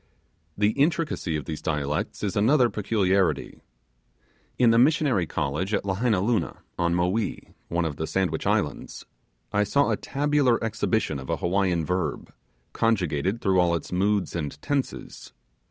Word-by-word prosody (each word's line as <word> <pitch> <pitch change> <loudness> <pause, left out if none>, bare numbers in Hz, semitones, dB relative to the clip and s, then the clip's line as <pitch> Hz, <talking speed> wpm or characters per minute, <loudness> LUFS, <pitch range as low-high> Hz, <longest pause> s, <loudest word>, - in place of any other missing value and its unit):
The 105 +1 +3
intricacy 145 - 0
of 75 - -4
these 80 -2 -5
dialects 75 +2 -2
is 105 0 -1
another 120 +4 +4
peculiarity. 100 -3 0 1.0
In 120 -2 +5
the 115 - +4
Missionary 130 - +3
College 90 +11 -1
at - - -1
Lahainaluna, 100 -1 0 0.2
on 85 0 +2
Mowee, 90 +5 -1
one 85 0 -1
of 75 -3 -3
the 80 - -3
Sandwich 95 -2 -1
Islands, - - -1 0.5
I 105 +1 +3
saw 140 +8 +2
a - - +1
tabular 145 -4 +1
exhibition 110 -7 -1
of 65 - -9
a - - +1
Hawiian 90 -2 0
verb, 90 -4 -2 0.4
conjugated 95 -2 0
through 95 -2 +2
all 85 -1 +3
its 80 - -5
moods 100 +1 0
and 75 -4 -4
tenses. 140 - -4
95 Hz, 140 wpm, -25 LUFS, 85-115 Hz, 1.0 s, In